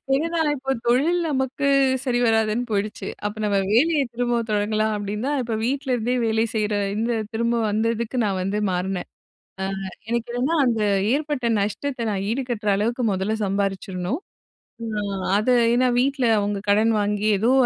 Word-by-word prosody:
என்னனா 330 +3 0 0.2
இப்ப 270 0 -2
தொழில் 285 +9 +3
நமக்கு 265 0 -1 0.4
சரிவராதுன்னு 235 -2 +2
போயிடுச்சு, 205 -1 -2 0.2
அப்ப 205 +1 -2
நம்ம 205 -1 +1
வேலைய 295 +7 +3
திரும்பவும் 240 -1 -1
தொடங்கலாம் 215 +1 +1
அப்டின்னுதான் 210 +8 -2
இப்ப 230 -2 -3
வீட்ல 265 +1 0
இருந்தே 245 +1 0
வேலை 220 0 +2
செய்யுற 210 -1 0 0.2
இந்த 230 +2 0 0.2
திரும்பவும் 230 -1 0
வந்ததுக்கு 230 +3 -1
நான் 195 -2 0
வந்து 195 +3 -1
மாறுனேன். 180 +1 -2 0.5
அ, - - -1 0.5
எனக்கு 235 0 -1
என்னன்னா, 255 +7 0
அந்த 230 -3 +1 0.3
ஏற்பட்ட 290 -4 -1
நஷ்டத்த 235 +5 -2
நான் 195 -1 -2
ஈடுகட்டுற 240 -4 -2
அளவுக்கு 235 +5 -1
முதல்ல 190 +3 -1
சம்பாரிச்சிரணும். 195 - -2 0.6
அ - - -3 0.5
அத, 215 +4 0 0.2
ஏன்னா 255 +1 +3
வீட்ல 270 0 +1
அவுங்க 205 0 -1
கடன் 220 +3 +4
வாங்கி 205 0 0
ஏதோ 230 +5 +3
230 Hz, 145 wpm, -23 LUFS, 210-255 Hz, 0.6 s, கடன்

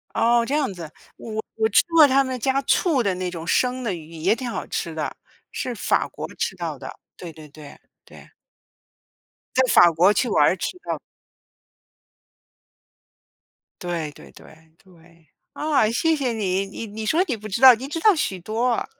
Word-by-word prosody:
哦， 235 +1 +3
这 280 - -2
样 285 -9 0
子， 165 -4 -9 0.2
我 220 -1 -6
我 220 0 +1
吃 220 - +4
过 320 -2 +8
他 275 0 +3
们 260 -1 -4
家 270 +3 0
醋 300 -5 +2
的 200 -4 0
那 185 0 -3
种 165 -2 -7
生 250 +8 0
的 225 - -2
鱼 160 -1 -10
也 170 +6 +1
挺 255 -2 -5
好 - - -4
吃 - - -4
的， - - -4 0.4
是 250 - -4
法 - - 0
国 - - -7
吃 - - -2
到 - - -5
的， - - -8 0.3
对 170 -3 -9
对 155 -1 -13
对， 145 0 -13 0.3
对。 - - -17 1.2
在 260 - +5
法 175 - +7
国 180 +6 +4
去 245 - 0
玩 180 -2 +3
吃 365 - -4
到 - - -2
的。 - - -8 2.8
对， 170 -4 -3
对 - - -15
对， 160 0 -18
对， 170 -3 -22 0.2
啊， 295 -8 +1
谢 320 +8 +1
谢 260 -5 -1
你， 195 -3 -1
你 200 +3 -7
你 215 +1 -7
说 325 +10 +2
你 255 -9 -2
不 215 0 -9
知 195 - -3
道， 260 -2 +10
你 255 +4 -7
知 325 +3 -4
道 420 +3 +5
许 200 - -2
多 225 +7 -1
啊。 235 - -1
220 Hz, 195 characters per minute, -22 LUFS, 175-260 Hz, 2.8 s, 道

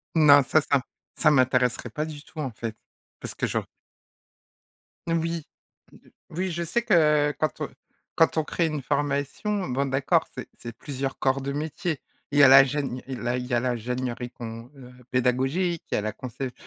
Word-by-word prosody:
Non, 145 -3 +7
ça, 155 +4 +3
ça 140 -2 +1 0.4
ça 155 - +5
m'intéresserait 125 -2 +2
pas 150 +7 -3
du 150 -2 -8
tout, 160 - -21
en 135 -5 -2
fait, 110 0 -5 0.4
parce - - -6
que - - -2
j'aur - - -2 1.4
Oui. 165 -1 -1 0.5
o - - -15
o - - -16 0.4
oui, 185 0 -1
je 170 +1 -2
sais 235 +8 0
que 150 -9 +4
quand 155 - -1
on - - -2 0.5
quand 165 0 +3
on 155 - +3
crée 170 +2 0
une 155 -3 -2
formation, 145 - -1
bon, 135 +3 0
d'accord, 135 0 +1
c'est - - -7
c'est 120 -1 -8
plusieurs 135 -1 -4
corps 135 0 +1
de 140 +1 -3
métier. 155 +1 -3 0.3
Il 145 - +2
y - - +9
a - - +10
la 135 0 +9
gène 135 -2 -3
il 130 -2 -5
là, 120 +1 -1
il 125 - -4
y 125 - -4
a 120 - +4
la 130 - 0
l'ingénierie 125 +1 -3
qu'on, 115 +1 -8
heu 125 -2 -13 0.2
pédagogique. 135 +8 +1
Il - - +1
y - - +2
a - - 0
la 110 0 -2
concep 130 +3 -6
140 Hz, 200 wpm, -26 LUFS, 125-155 Hz, 1.4 s, a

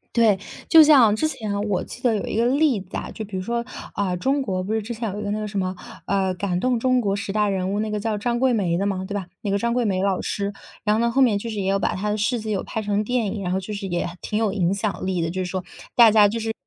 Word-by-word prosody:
对， 220 -5 +4 0.3
就 320 - +9
像 270 -8 +7
之 220 +9 +1
前 210 -8 -3
我 195 -3 0
记 245 - -10
得 240 -3 +2
有 205 - -2
一 - - -3
个 230 - +3
例 275 -2 +3
子 185 -1 -10
啊。 - - -4
就 220 - -6
比 195 -1 -8
如 185 - -2
说， 235 +2 -2 0.3
啊， 190 -3 0
中 270 +10 0
国 185 -7 -2
不 210 +4 -3
是 220 - 0
之 235 +3 -5
前 225 -3 -3
有 205 - -5
一 - - -4
个 - - -2
那 210 - -1
个 215 - -3
什 200 -1 -3
么， 185 0 -2 0.3
呃， 190 -1 +1
“感 180 -1 -1
动 250 -2 +1
中 255 +1 +2
国 200 -3 0
十 200 0 -4
大 210 -1 +2
人 190 -1 -1
物”， 210 - 0
那 215 - -2
个 210 - -1
叫 215 0 -1
张 235 +3 -1
桂 260 0 +3
梅 180 -6 +1
的 195 - 0
吗， 190 -2 -1
对 200 - -6
吧？ 200 -2 -3 0.2
那 200 - -2
个 200 - +2
张 235 +3 0
桂 245 -1 +1
梅 190 -3 0
老 195 -1 +1
师。 200 0 -2 0.3
然 210 0 +3
后 225 - +1
呢， 235 0 +2
后 270 - +2
面 225 -6 +4
就 230 +3 -5
是 215 -2 -4
也 190 - -1
有 195 - +2
把 - - 0
她 210 +3 -2
的 210 - -1
事 235 +3 0
迹 215 0 -6
有 195 - -1
拍 220 - -4
成 205 0 0
电 245 +1 0
影， 200 0 -4
然 180 - -2
后 190 - +1
就 210 +3 -6
是 200 -1 -4
也 175 -1 -1
挺 210 - -2
有 215 -3 +1
影 185 -2 +1
响 200 -1 -2
力 185 -2 0
的。 165 - -1
就 185 +2 -2
是 180 - -5
说， 185 -1 -3 0.3
大 235 -2 +8
家 210 -1 +6
就 225 +3 -2
是 225 0 -2
210 Hz, 340 characters per minute, -23 LUFS, 195-230 Hz, 0.3 s, 就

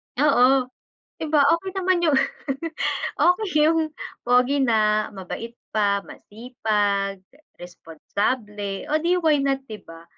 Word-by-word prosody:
Oo. 265 -2 +4 0.5
Di 315 - -3
ba, 300 -2 +4
okey 380 +3 -7
naman 370 -2 +1
yung 310 -4 +3 1.0
okey 360 +3 +3 0.2
yun 320 -1 0 0.3
pogi 250 +3 +3
na 215 -3 +2
mabait 225 +5 -7 0.2
pa, 200 -2 +1
masipag, 205 -4 -2 0.2
eh, 310 - -25 0.2
responsable. 200 +4 -4
Oh, 310 - +2
di 345 +3 +1
why 310 -4 +3
not 270 -1 0
di 215 -1 -8
ba? 165 0 -13
245 Hz, 125 wpm, -23 LUFS, 205-300 Hz, 1.0 s, Oo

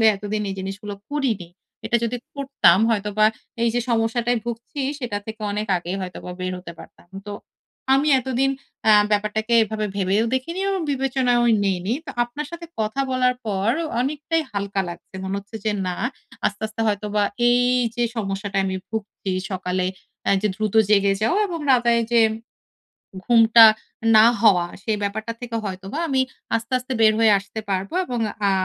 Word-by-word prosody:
আসলে 225 - +3
এতদিন 210 +1 -3
এই 195 - -4
জিনিসগুলো 200 +2 -6 0.2
করিনি। 235 -12 -1 0.4
এটা 240 - +2
যদি 240 +2 -1 0.2
করতাম 275 -10 +3
হয়তোবা 210 0 +2 0.4
এই 235 - +3
যে 245 - +2
সমস্যাটায় 235 +1 +1
ভুগছি, 235 +4 -6 0.2
সেটা 235 -6 -3
থেকে 220 0 -7
অনেক 210 +1 -2
আগেই 175 +2 -4
হয়তোবা 180 -1 -7
বের 185 0 -2
হতে 180 -1 -9
পারতাম। - - -15 0.2
তো - - -4 0.6
আমি 280 +3 +2
এতদিন 265 +2 0 0.4
আ - - +8 0.2
ব্যাপারটাকে 215 +2 0
এভাবে 215 0 -2
ভেবেও 200 +3 +2
দেখিনি 335 +8 -2
এবং 385 -2 -1
বিবেচনাও 260 -3 +1 0.2
নিইনি। 190 +2 0
তো - - -5
আপনার 290 +5 -6
সাথে 340 0 -8
কথা 220 +5 -1
বলার 255 0 +2
পর 200 0 -1 0.3
অনেকটাই 300 +5 -1
হালকা 200 -1 -2
লাগছে। 175 +2 -10
মনে 190 +1 -2
হচ্ছে 205 +3 -9
যে 215 - +2 0.2
না 180 - -2 0.5
আস্তে, 205 +1 -4
আস্তে 215 +1 -8
হয়তোবা 210 0 0 0.3
এই 245 0 +4 0.4
যে 240 - 0
সমস্যাটায় 195 -1 -1
আমি 190 - -2
ভুগছি 210 -3 -4 0.2
সকালে 185 -1 -1 0.4
অ্যা - - +3
যে 210 - +2
দ্রুত 215 -2 -2 0.2
জেগে 200 -1 +4
যাও 225 - +2
এবং 345 -4 -4
রাতে 240 -2 +4
এইযে 230 +1 +2 1.0
ঘুমটা 230 -1 +7 0.5
না 215 - +8 0.2
হওয়া, 180 -6 +5 0.2
সে 220 - -1
ব্যাপারটা 220 +3 -2
থেকে 240 -2 -4
হয়তোবা 195 +7 -5
আমি 265 -2 +2 0.4
আস্তে, 230 +2 -7
আস্তে 255 +1 -6
বের 220 -1 +6
হয়ে 225 -2 +5
আসতে 205 +3 -7
পারব। 190 0 -1 0.2
এবং 245 -2 -3 0.3
আ - - +3
220 Hz, 165 wpm, -22 LUFS, 200-245 Hz, 1.0 s, আ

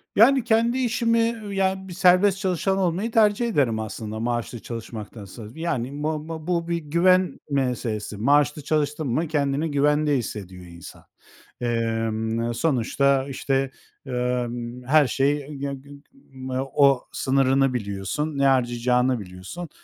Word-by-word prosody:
Yani, 255 +4 +6
kendi 230 +2 +2
işimi, 230 -2 +1 0.2
ııı, 210 -3 -7
ya 190 0 0
bir 180 - -8
serbest 185 +2 +4
çalışan 190 0 0
olmayı 190 +4 0
tercih 220 +1 +3
ederim 135 - +1
aslında 110 0 -5
maaşlı 120 0 -2
çalışmaktansa. 110 -2 -8
Yani, 145 -4 -3
bu 155 0 -2
bu 160 -1 -6
bu, 170 -2 0
bir 170 0 0
güven 175 +4 +2
meselesi. 120 -6 -2
Maaşlı 145 +6 +2
çalıştın 150 0 -1
mı 155 +7 0
kendini 145 0 0
güvende 145 0 +2
hissediyor 95 -6 -6
insan. 85 -1 -12 0.6
Emm, 115 0 -1
sonuçta, 135 +1 +1
işte, 135 0 -1 0.3
emm, 125 -1 -3
her 150 0 +5
şey, 140 +2 0
g 140 0 -3
g 135 +1 -11
g - - -10 0.8
o 140 -3 +4
sınırını 135 0 +2
biliyorsun, 110 +7 -3
ne 140 - +2
harcayacağını 125 -1 +2
biliyorsun. 95 - -8
140 Hz, 130 wpm, -24 LUFS, 120-170 Hz, 0.8 s, Yani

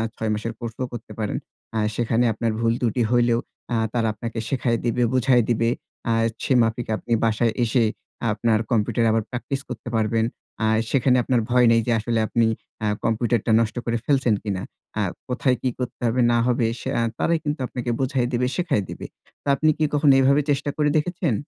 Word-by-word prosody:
৬ 110 -1 -2
মাসের 110 +2 -3
কোর্সও 120 +2 -4
করতে 115 -2 -8
পারেন। 105 -2 -1 0.4
অ্যা 110 - 0
সেখানে 120 +1 +1
আপনার 115 +1 -1
ভুল 115 0 +2
ত্রুটি 120 0 +1
হইলেও 120 -1 +3 0.3
আ - - +2 0.2
তারা 115 -2 +1
আপনাকে 115 +2 -5
শেখায় 120 -3 +1
দিবে, 120 +1 +1
বুঝায় 130 -2 +4
দিবে। 115 0 +2 0.4
আ - - +3 0.3
সে 135 - +2
মাফিক 115 +1 0
আপনি 120 - -10
বাসায় 115 +1 +2
এসে 120 +1 +2 0.5
আপনার 110 +1 +1
কম্পিউটারে 115 +1 +2
আবার 110 -1 +1
প্র্যাকটিস 135 +3 -3
করতে 125 -1 -6
পারবেন। 110 0 +1 0.4
আ - - +3 0.2
সেখানে 130 -1 +3
আপনার 120 -1 +2
ভয় 125 0 +5
নেই 115 0 +4
যে - - +2
আসলে 115 +1 -1
আপনি 115 +1 +2 0.4
আ - - +2 0.2
কম্পিউটারটা 115 0 +1
নষ্ট 115 -1 0
করে 120 0 0
ফেলছেন 135 -5 +2
কিনা। 100 -3 -2 0.4
আ - - +2 0.3
কোথায় 125 0 +1
কি 130 - +1
করতে 125 - -5
হবে 120 +2 +1
না 120 - +3
হবে 120 -1 +2
সে - - -4 0.3
তারাই 170 0 +2
কিন্তু 150 -1 -2
আপনাকে 125 -1 -4
বুঝায় 130 -2 0
দিবে, 125 +1 +1
শেখায় 170 - 0
দিবে। - - -7 0.4
তো - - -12
আপনি 155 +3 +2
কি 155 - +2
কখনো 145 -1 +5
এভাবে 140 +2 +4
চেষ্টা 145 +1 0
করে 150 -1 +2
দেখেছেন? 170 -3 0
120 Hz, 185 wpm, -23 LUFS, 115-130 Hz, 0.5 s, ভয়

